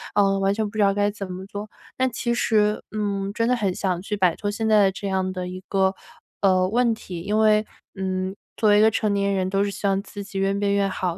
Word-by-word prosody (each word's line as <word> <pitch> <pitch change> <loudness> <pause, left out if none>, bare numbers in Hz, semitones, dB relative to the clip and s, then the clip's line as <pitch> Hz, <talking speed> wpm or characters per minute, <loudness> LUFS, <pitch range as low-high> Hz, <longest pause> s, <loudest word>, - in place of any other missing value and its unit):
呃， 195 -1 +3
完 195 +1 +2
全 220 0 -1
不 - - -18
知 - - -2
道 195 0 +4
该 205 0 +1
怎 200 -2 -7
么 185 +1 -7
做。 205 +1 -7 0.3
但 260 0 +2
其 235 +1 -1
实， 210 -3 +2
嗯， 200 -2 -2
真 230 +1 0
的 250 - +3
很 195 -5 0
想 180 -3 -1
去 210 +2 -3
摆 180 -4 +3
脱 205 - -3
现 220 +2 -2
在 205 -2 +5
这 200 +1 -6
样 185 -1 -1
的 180 -1 -4
一 185 0 -7
个， 190 -1 +2 0.5
呃， 185 -2 +3
问 235 +1 +2
题， 180 -5 -8
因 210 +4 0
为， 215 0 +4 0.3
嗯， 190 0 -2 0.2
作 215 -2 +3
为 205 - +6
一 - - +5
个 220 0 +5
成 210 -2 0
年 200 0 +1
人 185 -1 0
都 195 +1 +1
是 200 - -1
希 200 +1 -3
望 195 0 +1
自 205 0 -8
己 200 0 -8
越 195 0 +1
变 200 0 0
越 200 0 +2
好 185 -2 -2
200 Hz, 275 characters per minute, -23 LUFS, 190-210 Hz, 0.5 s, 为